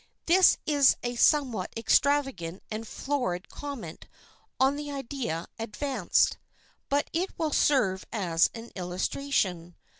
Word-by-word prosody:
This 365 +2 +6
is 285 -3 +5
a 245 0 -2
somewhat 245 - +2
extravagant 230 - +1
and 220 +1 -5
florid 225 -12 -3
comment 250 - -8 0.5
on 265 +2 +4
the 295 0 -5
idea 265 - -4
advanced. 255 +5 0 0.5
But 285 +1 +1
it 355 +4 -2
will 315 -3 -1
serve 195 -10 +2
as 170 -6 +2
an 230 +1 -9
illustration. 180 -1 -2
245 Hz, 115 wpm, -28 LUFS, 185-285 Hz, 0.5 s, This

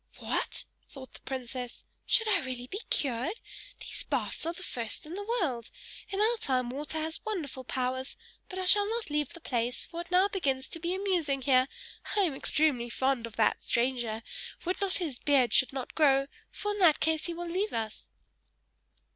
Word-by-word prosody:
"What!" - - -1 0.3
thought 265 -2 -11
the - - -9
princess. 250 -2 -5 0.2
"Should 450 -2 +4
I 410 -2 +4
really 255 -2 -4
be 395 - -5
cured! 265 - 0 0.5
These - - -4
baths - - -2
are 335 - 0
the 375 - -9
first 235 -6 -2
in 310 - -7
the 400 - -3 0.2
world! 250 - -1 0.4
In 390 - -2
our 450 +3 +4
time 255 -6 +1
water 295 +4 -4
has 315 +1 -3
wonderful 315 -11 -3
powers. 260 +1 -2 0.3
But 370 - -6
I 375 - -1
shall 410 +2 +6
not 455 -7 -3
leave 295 -2 0
the 340 - -10
place, 245 -5 -1
for 340 0 -5
it 345 - -11
now 365 +2 +5
begins 270 -10 0
to 330 - -7
be 345 +3 -1
amusing 340 -9 0
here. 255 -1 +5 0.5
I - - +6
am 345 -7 +2
extremely 270 -3 +1
fond 260 -1 +1
of 225 - -12
that 220 -2 +2
stranger: 235 -2 0 0.4
would 365 +2 0
that 395 -2 0
his 310 -9 -3
beard 265 -6 +4
should 265 - +6
not 265 -2 -5
grow, 275 -3 +5 0.2
for 415 - -3
in 415 - -3
that 330 -5 +6
case 315 0 +1
he 340 - -3
will 345 +1 -4
leave 380 +5 0
us!" 220 -1 -3
290 Hz, 190 wpm, -30 LUFS, 255-360 Hz, 0.5 s, shall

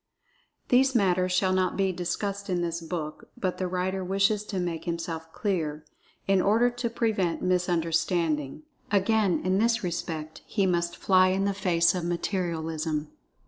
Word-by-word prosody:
These 265 +1 +4
matters 185 -4 +2
shall 185 +1 +2
not 185 -1 +1
be 195 -1 +2
discussed 200 +3 -3
in 175 -1 0
this 170 0 -2
book, 160 -2 -5
but 185 -2 -2
the 185 - 0
writer 185 +1 -2
wishes 195 +3 +1
to 195 -3 -3
make 170 -2 -3
himself 165 -1 -4
clear, 160 -8 -2 0.4
in 195 -1 +3
order 230 +5 +3
to 240 -1 -3
prevent 210 -7 0
misunderstanding. 170 - 0 0.3
Again, 205 -1 +2
in 185 +1 +2
this 230 0 +2
respect, 165 -3 -4
he 200 -3 +1
must 175 -1 0
"fly 185 -1 +4
in 190 +1 +1
the 200 - +1
face 170 -3 +2
of 180 -2 -3
Materialism." 165 -3 -2
180 Hz, 150 wpm, -27 LUFS, 170-195 Hz, 0.4 s, These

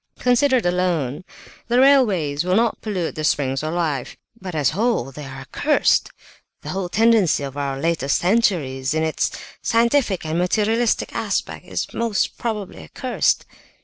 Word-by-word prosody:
"Considered 250 -1 +2
alone, 175 -5 0 0.4
the 240 +1 +2
railways 200 - +3
will 180 +1 +1
not 230 +1 +1
pollute 190 -6 -3
the 155 - -5
springs 135 -3 0
of 155 +2 -3
life, 155 -7 -2 0.2
but 185 -3 -6
as 145 -3 +2
a - - -8
whole 210 - 0
they 145 +2 -9
are 135 0 -8
accursed. 290 - +1 0.5
The - - -7
whole 190 -1 -3
tendency 220 -8 +3
of 135 -1 -6
our 140 -1 -3
latest 160 -3 +1
centuries, 165 - +1
in 160 - +1
its 160 -1 0 0.3
scientific 230 - +1
and 160 +2 -1
materialistic 220 +6 +1
aspect, - - -3
is - - -4
most 230 -3 -1
probably 210 - -4
accursed." 80 - -1
180 Hz, 150 wpm, -21 LUFS, 145-225 Hz, 0.5 s, railways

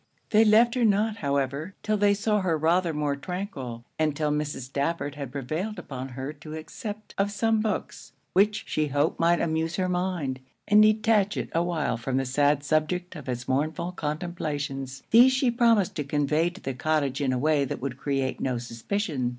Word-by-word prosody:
They 215 +1 +6
left 225 +2 +5
her 250 - +1
not, 215 0 +2
however, 140 - -2
till 215 - +1
they 205 -1 +3
saw 210 +1 +1
her 170 -4 +1
rather 170 +3 +2
more 150 -2 -1
tranquil; 140 - -6
and 155 -2 +1
till 150 -1 0
Mrs. 150 -2 -2
Stafford 140 +3 -2
had 140 -4 -6
prevailed 155 - -3
upon 130 -1 -6
her 135 +3 -4
to 155 +1 -9
accept 210 +7 -7
of 200 +1 +2
some 220 +2 +1
books, 215 -1 -3 0.2
which 210 +3 +3
she 155 -1 0
hoped 145 +3 0
might 170 +1 +3
amuse 160 0 -1
her 185 +1 0
mind, 180 -7 -1 0.3
and 210 0 +6
detach 215 -1 +3
it - - -3
awhile 165 -7 0
from 130 +3 -2
the 135 - 0
sad 145 +2 +2
subject 160 +4 0
of 145 -5 -8
it's 120 -1 -4
mournful 155 +6 -1
contemplations. 150 -5 -4
These 245 +3 +7
she 255 -1 +2
promised 230 -5 +3
to 150 - -1
convey 150 +3 +1
to 180 +3 -13
the 135 - -3
cottage 145 0 0
in 135 -2 +1
a 130 - 0
way 150 +2 +2
that 135 - -4
could 130 -1 -4
create 135 -2 -1
no 130 -2 0
suspicion. 125 - -2
155 Hz, 185 wpm, -26 LUFS, 140-200 Hz, 0.3 s, These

